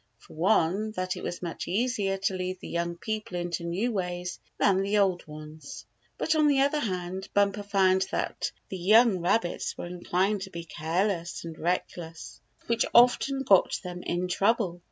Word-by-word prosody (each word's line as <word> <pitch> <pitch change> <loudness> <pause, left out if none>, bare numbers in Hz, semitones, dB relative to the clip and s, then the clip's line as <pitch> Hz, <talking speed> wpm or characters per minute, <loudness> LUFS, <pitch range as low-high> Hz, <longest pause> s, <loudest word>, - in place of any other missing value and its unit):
For - - -17
one, 190 +4 +2
that 185 -2 -2
it - - -7
was 175 - -5
much 170 -2 -5
easier 205 -1 0
to 195 0 -1
lead 185 0 -3
the - - -9
young 170 0 -2
people 215 -1 -4
into 175 -1 -3
new 185 +8 -1
ways 180 -3 -3 0.2
than 195 -2 +3
the 200 +2 +1
old 190 -5 +1
ones. 150 -1 -10 0.3
But 320 - +1
on 305 -1 +4
the 280 -2 +4
other 285 +2 +2
hand 185 -4 -3
Bumper 200 0 +2
found 190 -2 +2
that - - -2 0.2
the 190 - -5
young 215 +2 +5
rabbits 175 +2 0
were - - -5
inclined 180 +3 -1
to 195 - -6
be 170 -2 -7
careless 170 +2 -2
and 165 -1 -7
reckless, 170 -1 -4 0.2
which 230 -1 +1
often 270 +3 +5
got 195 -7 +4
them 180 -1 -6
in 175 +1 -2
trouble. 195 -1 +1
185 Hz, 175 wpm, -28 LUFS, 175-210 Hz, 0.3 s, young